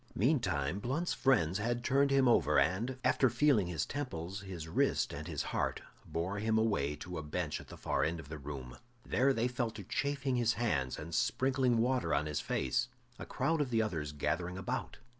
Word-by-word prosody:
Meantime 95 - +1
Blunt's 135 +10 -1
friends 100 - +2
had 120 +2 -1
turned 140 +2 +3
him 135 -1 +4
over, 120 - +4
and, 120 +8 +1
after 130 0 +4
feeling 120 -5 +3
his 85 -5 -1
temples, 100 - -4
his 90 -5 -7
wrist, 80 - +1
and - - -6
his - - -2
heart, - - -1 0.2
bore 90 +5 -2
him 110 +1 +1
away 100 -11 +1
to 90 +2 -6
a - - -4
bench 75 +1 -3
at - - -15
the - - -10
far - - 0
end 85 +1 -1
of 80 - -9
the 75 0 -7
room. 70 -3 -7 0.3
There 130 +3 +3
they 120 -2 +1
fell 125 -2 -1
to 105 -2 -8
chafing 140 +4 -1
his 120 -1 +3
hands 70 - 0
and 80 +2 -7
sprinkling 130 - +2
water 120 -7 +2
in 75 - +1
his 75 -1 -2
face, - - 0 0.3
a - - -7
crowd 165 -1 0
of 140 - -1
the 115 -2 +2
others 80 -9 -3
gathering 85 +5 -2
about. 95 - -3
105 Hz, 195 wpm, -33 LUFS, 80-130 Hz, 0.3 s, him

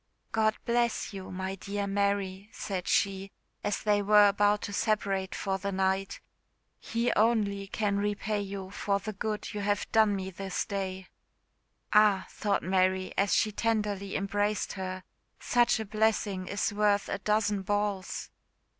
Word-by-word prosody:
"God 220 -1 +2
bless 235 -2 0
you, 190 -1 -7
my 190 +1 -4
dear 200 +1 -3
Mary!" 200 0 -1
said 185 -3 -4
she, 195 0 +1 0.3
as 205 - -1
they 205 -1 +3
were 205 0 +6
about 205 +1 +2
to 200 - -4
separate 195 -3 0
for 195 -1 -2
the 200 +1 -3
night. 190 0 0 0.6
"He 235 +1 0
only 210 -3 +2
can 205 0 0
repay 205 +1 -1
you 195 -1 -6
for 200 0 0
the 205 +2 -5
good 210 +1 -4
you 210 - -3
have 205 0 0
done 220 -2 +4
me 190 -1 -4
this 190 0 -3
day!" 190 -2 -4 0.9
"Ah!" 210 -3 +5
thought 205 -2 -1
Mary, 185 0 +1
as 200 0 +2
she 215 - +2
tenderly 210 -3 -1
embraced 205 +1 0
her, 185 -1 -5 0.4
"such 240 -2 +3
a 220 - -3
blessing 210 -3 0
is 205 0 -1
worth 205 -1 +2
a - - -3
dozen 210 -1 +1
balls?" 205 -1 -2
200 Hz, 150 wpm, -29 LUFS, 195-210 Hz, 0.9 s, were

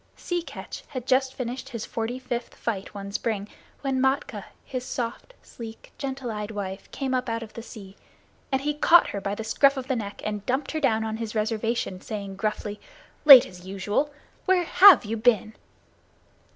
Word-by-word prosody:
Sea 350 -1 -2
Catch - - -8
had 255 -3 -6
just 260 0 +2
finished 255 +1 -5
his 230 -2 -5
forty 230 +2 -3
fifth 240 -2 -5
fight 205 -3 -4
one 200 0 -6
spring 205 -1 -2 0.3
when 270 -2 0
Matkah, 270 - 0 0.2
his 255 -2 -4
soft, 250 - -5
sleek, 225 -1 -10
gentle 265 -3 -4
eyed 210 -1 -4
wife, 200 -2 -6
came 270 -2 -3
up 255 -1 0
out 230 0 -2
of 220 - -12
the 230 - -7
sea, 200 -4 -11 0.6
and 265 0 +1
he 295 +1 0
caught 330 +3 +5
her 200 - -4
by 200 0 -2
the 225 - -5
scruff 275 +6 +3
of 260 -1 -4
the 265 - 0
neck 205 -3 -5
and 210 -1 -3
dumped 265 +2 0
her 315 - -2
down 225 -7 +2
on 220 0 -3
his 225 -1 -5
reservation, 220 -3 -1
saying 200 -3 -6
gruffly: 210 0 -3 0.5
"Late 275 -4 +12
as 180 0 -12
usual. 205 +9 -1 0.4
Where 370 -1 +4
have 365 - +8
you 225 +2 -2
been?" 220 -1 +2
230 Hz, 185 wpm, -26 LUFS, 210-265 Hz, 0.6 s, Late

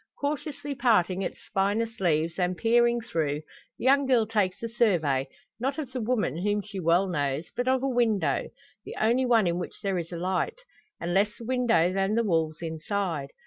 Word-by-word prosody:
Cautiously 290 0 -3
parting 200 -9 +2
its 190 - -4
spinous 220 +4 -1
leaves 165 -1 +1
and 180 0 0
peering 235 +2 +3
through, 155 -8 -2 0.3
the - - -6
young 275 +1 +4
girl 245 -4 +4
takes 210 -2 -1
a - - -1
survey, 170 - +1 0.3
not 270 +4 -1
of 285 -5 -5
the 255 -1 -3
woman, 215 - 0
whom 205 +3 +1
she 200 -2 -7
well 170 +2 +3
knows, 145 -3 -2
but 245 +1 -1
of 260 0 +2
a - - +2
window 220 - +1 0.3
the - - -8
only 240 +4 +2
one 230 -4 +4
in 170 0 0
which 175 - -6
there 195 -2 0
is 170 0 -6
a 170 - -4
light. 185 - -1 0.4
And 175 +1 -3
less 205 +2 +2
the 230 - -9
window 225 -9 +2
than 195 +2 +1
the 230 - +2
walls 165 -5 0
inside. 165 -2 -3
200 Hz, 190 wpm, -27 LUFS, 170-240 Hz, 0.4 s, young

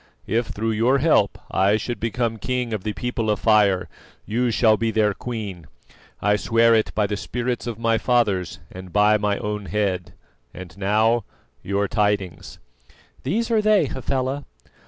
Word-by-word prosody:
If 115 +3 0
through 110 +2 -2
your 115 +5 +2
help 135 -8 +2
I 100 +3 +3
should 120 +3 -4
become 115 0 -1
King 125 0 -2
of 105 - -2
the 105 - -2
People 120 -2 -2
of 105 - +1
Fire, 105 -4 +3 0.4
you 120 +3 0
shall 110 -1 +4
be 115 +1 -1
their 110 -1 +2
Queen, 100 -9 -6 0.6
I 105 0 +3
swear 115 +2 +3
it 110 -1 +2
by 105 - +2
the 105 +1 -2
spirits 120 +3 -3
of 115 -3 -4
my 115 -1 +1
fathers 105 -8 +1
and 95 0 -10
by 105 +2 +4
my 105 -1 0
own 105 -1 -4
head. 100 -3 -2 0.4
And 90 -2 -9
now 110 +4 +2 0.4
your 100 +2 -1
tidings." 105 -4 -1 0.6
"These 225 - -1
are 220 -2 +3
they, 210 -5 +4
Hafela. 130 +1 -2
110 Hz, 160 wpm, -23 LUFS, 100-120 Hz, 0.6 s, shall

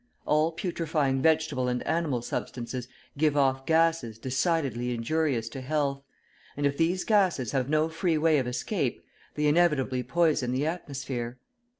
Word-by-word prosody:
All 155 +2 +2
putrefying 160 -6 -1
vegetable 155 -5 +2
and 125 0 -1
animal 150 -8 -1
substances 125 0 -4 0.3
give 150 -1 +2
off 135 -1 +2
gases 160 -8 +2
decidedly 130 -2 -1
injurious 125 -1 0
to 130 - -7
health, 140 0 -1 0.6
and 145 - 0
if 140 0 +1
these 170 +4 +1
gases 185 - +2
have 135 -1 -1
no 155 +1 +2
free 160 0 0
way 155 -1 +3
of 130 - -2
escape, 125 0 -2 0.3
they 150 - 0
inevitably 150 -5 +2
poison 140 -2 +1
the 135 +3 0
atmosphere. 135 -7 -4
145 Hz, 140 wpm, -28 LUFS, 130-160 Hz, 0.6 s, way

